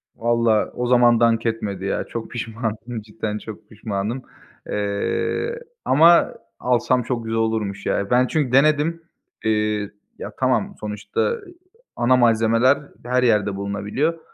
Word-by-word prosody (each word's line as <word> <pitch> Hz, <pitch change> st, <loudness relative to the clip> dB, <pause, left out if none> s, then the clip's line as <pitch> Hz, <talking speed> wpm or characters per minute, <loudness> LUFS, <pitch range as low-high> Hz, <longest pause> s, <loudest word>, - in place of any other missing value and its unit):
Vallahi 115 Hz, -2 st, +2 dB
o 125 Hz, 0 st, -2 dB
zaman 120 Hz, -2 st, +5 dB
dank 115 Hz, -1 st, +3 dB
etmedi 100 Hz, -4 st, -2 dB
ya, 100 Hz, -, -1 dB
çok 115 Hz, -1 st, -7 dB
pişmanım, 115 Hz, 0 st, -4 dB
cidden 105 Hz, 0 st, -5 dB
çok 110 Hz, -1 st, -10 dB
pişmanım, 105 Hz, +3 st, -4 dB, 0.5 s
eee, 105 Hz, -, -1 dB, 0.3 s
ama 165 Hz, +5 st, +5 dB, 0.3 s
alsam 125 Hz, 0 st, +1 dB
çok 120 Hz, -1 st, -3 dB
güzel 115 Hz, 0 st, -2 dB
olurmuş, 110 Hz, -3 st, -1 dB
ya. 100 Hz, -, -1 dB
Ben 125 Hz, +1 st, +3 dB
çünkü 145 Hz, -5 st, 0 dB
denedim, 155 Hz, +4 st, +3 dB, 0.4 s
eee, 105 Hz, -1 st, 0 dB, 0.3 s
ya, -, -, -6 dB
tamam -, -, +1 dB
sonuçta 105 Hz, -, -2 dB, 0.6 s
ana 130 Hz, +2 st, +3 dB
malzemeler 115 Hz, +2 st, +4 dB, 0.3 s
her 125 Hz, +1 st, +1 dB
yerde 105 Hz, -4 st, +2 dB
bulunabiliyor 105 Hz, +11 st, -2 dB
115 Hz, 125 wpm, -22 LUFS, 105-125 Hz, 0.6 s, zaman